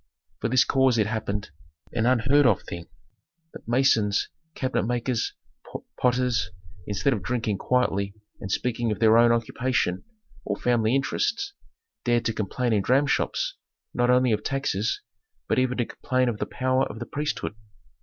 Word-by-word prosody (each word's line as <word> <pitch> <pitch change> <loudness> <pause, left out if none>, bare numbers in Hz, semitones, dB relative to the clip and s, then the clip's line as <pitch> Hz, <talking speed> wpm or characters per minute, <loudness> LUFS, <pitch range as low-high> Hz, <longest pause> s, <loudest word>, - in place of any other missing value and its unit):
For - - -1
this 130 +1 +5
cause 130 -3 +3
it 110 - +3
happened, 105 -3 -3 0.4
an 115 0 +1
unheard 130 +3 +4
of 105 -6 +2
thing, 85 0 -7 0.7
that - - -12
masons, 115 -5 +2 0.3
cabinet 130 -6 -1
makers, 120 -1 -1 0.6
potters, 125 -6 +1 0.4
instead 105 +7 +1
of 105 - -3
drinking 110 -2 -1
quietly 100 -6 0 0.2
and 95 - -6
speaking 120 0 0
of 105 - -1
their 110 -1 +5
own 120 0 +6
occupation, 115 -4 0 0.4
or - - -2
family 120 -1 +1
interests, 230 - -1 0.5
dared 120 -1 +1
to 115 - +1
complain 115 +3 -1
in 105 - +3
dramshops, 135 +6 +1 0.4
not 120 0 +1
only 125 0 +4
of 105 -1 +1
taxes, 125 -6 -1 0.4
but - - +2
even 130 0 +1
to 120 - +1
complain 130 +1 0
of 110 -3 -4
the - - -2
power 130 0 +1
of 105 - -8
the 120 - -5
priesthood. 145 -6 -3
120 Hz, 155 wpm, -25 LUFS, 110-130 Hz, 0.7 s, own